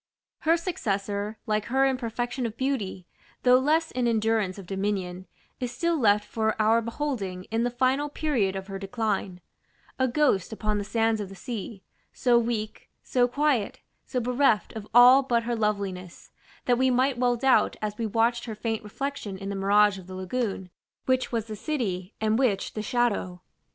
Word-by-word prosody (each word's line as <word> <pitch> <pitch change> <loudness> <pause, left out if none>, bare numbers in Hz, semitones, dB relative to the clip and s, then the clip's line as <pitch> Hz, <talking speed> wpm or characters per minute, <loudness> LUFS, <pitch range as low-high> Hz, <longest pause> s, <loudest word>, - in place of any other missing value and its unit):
Her 330 +1 +3
successor, 205 - -3
like 215 -1 0
her 265 +3 +2
in 265 -1 +2
perfection 245 +1 -3
of 225 0 -9
beauty, 220 -9 -2 0.4
though 250 0 +6
less 315 +4 +1
in 250 -1 0
endurance 220 -4 +1
of 195 - -9
dominion, 190 -1 -3 0.3
is 250 -2 -3
still 335 +7 0
left 210 -7 +3
for 220 0 -1
our 220 +2 +4
beholding 230 -7 -3
in 225 +1 +1
the 245 - +1
final 260 +4 +1
period 250 -11 0
of 190 0 -5
her 195 -1 -6
decline: 195 -3 -2 0.6
a 260 - +3
ghost 250 - +1
upon 215 -1 -1
the - - -2
sands 225 +1 +1
of 200 - -6
the 195 - -10
sea, 210 -2 -6 0.3
so 245 -2 +3
weak 225 -2 -3
so 245 -1 +2
quiet, 270 -4 0 0.2
so 255 - -2
bereft 245 -4 +2
of 215 -2 -7
all 245 +3 +8
but 240 -3 0
her 240 +1 -1
loveliness, 200 -5 -3 0.3
that 245 -1 +2
we 260 0 +4
might 255 0 +2
well 245 -1 +3
doubt, 265 +2 +3
as 210 -1 -3
we 225 - 0
watched 230 +2 +1
her 225 -3 -5
faint 220 0 -3
reflection 210 -2 -5
in 195 +1 -6
the 200 - -3
mirage 200 0 +3
of 180 - -13
the 185 - -8
lagoon, 190 -1 -3 0.3
which 255 0 +1
was 230 -3 -1
the 215 -1 -6
City, 205 - -3
and 220 +1 +1
which 220 -8 +1
the 215 - -3
Shadow. 220 -7 0
225 Hz, 180 wpm, -26 LUFS, 200-250 Hz, 0.6 s, all